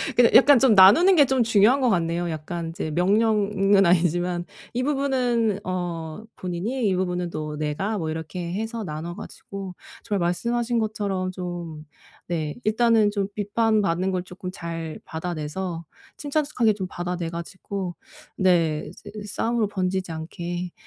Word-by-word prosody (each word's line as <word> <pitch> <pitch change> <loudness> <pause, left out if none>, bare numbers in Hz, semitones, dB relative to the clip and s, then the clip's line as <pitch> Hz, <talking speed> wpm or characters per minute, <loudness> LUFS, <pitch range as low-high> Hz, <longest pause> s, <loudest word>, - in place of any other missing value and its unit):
근데 245 -1 +6
약간 280 +1 +8
좀 260 -5 +5
나누는 215 - +8
게 290 - +7
좀 260 -2 +2
중요한 225 +4 +4
것 255 - +3
같네요. 170 -2 0
약간 165 +1 -4
이제 165 -1 -4
명령은 200 +1 +3
아니지만 175 0 +2 0.3
이 245 - -1
부분은 255 -6 +1
어 175 0 -4
본인이 205 +7 -2
이 190 - +2
부분은 180 -1 -1
또 150 -1 -5
내가 155 +8 -2
뭐 160 -3 -3
이렇게 170 +2 -5
해서 225 +3 -3
나눠 160 +2 -5
가지고 195 -2 -8 0.3
정말 205 -3 -1
말씀하신 235 +6 0
것처럼 200 -4 -2
좀 175 -4 -6 0.4
네 155 -4 -2
일단은 220 -1 +4
좀 200 -1 -2
비판 215 +1 +1
받는 185 0 0
걸 180 -1 -1
조금 180 0 -8
잘 165 -3 -6
받아내서 165 +1 -4 0.3
침착습하게 285 -7 +1
좀 195 -2 -4
받아내 175 -1 -3
가지고 180 +2 -5 0.4
네 165 -5 +2
이제 - - -12
이 210 - -6
싸움으로 225 +2 0
번지지 185 -2 -2
않게 175 +2 -5
185 Hz, 305 characters per minute, -24 LUFS, 170-220 Hz, 0.4 s, 약간